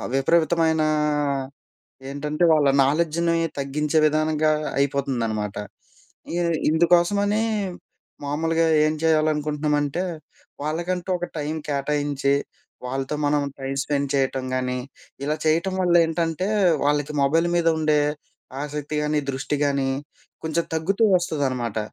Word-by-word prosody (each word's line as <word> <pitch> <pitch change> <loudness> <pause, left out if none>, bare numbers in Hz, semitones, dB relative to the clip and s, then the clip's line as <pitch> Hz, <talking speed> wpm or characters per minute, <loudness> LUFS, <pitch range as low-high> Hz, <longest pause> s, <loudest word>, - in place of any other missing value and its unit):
ఆహ్, - - -5
విపరీతమైనా 160 +2 +2 1.2
ఏంటంటే, 150 +4 -1
వాళ్ళ 145 -3 +4 0.2
నాలెడ్జ్‌ని 170 +3 +1 0.2
తగ్గించే 150 +3 0
విధానంగా 155 0 +2 0.3
అయిపోతుందనమాట. 120 -7 -1 0.8
ఇ - - -1 0.3
ఇందుకోసమనీ 180 +6 +3 0.8
మామూలుగా 165 +3 +1 0.2
ఏం 155 - 0
చేయాలనుకుంటున్నామంటే, 150 0 +1 0.6
వాళ్ళకంటూ 175 +4 -2
ఒక 175 - -3
టైం 150 +1 -2 0.2
కేటాయించి. 140 0 0 0.5
వాళ్ళతో 135 +3 -3
మనం 145 0 +2 0.2
టైం 135 0 -4
స్పెండ్ 140 -1 -1
చేయటం 135 -1 0
గానీ. 125 0 -1 0.5
ఇలా 150 +1 0
చేయటం 170 +4 +2
వల్ల 175 -1 +2
ఏంటంటే, 165 +3 -1 0.4
వాళ్ళకి 145 0 +1
మొబైల్ 165 +5 +2
మీద 165 -1 +3
ఉండే 155 -1 +3 0.6
ఆసక్తి 150 +1 -4
గాని, 150 0 +1
దృష్టి 135 +2 -2
గానీ 140 -1 0 0.6
కొంచెం 160 +1 0
తగ్గుతూ 195 +8 +1
వస్తదనమాట. 130 - -1
150 Hz, 105 wpm, -23 LUFS, 140-165 Hz, 1.2 s, వాళ్ళ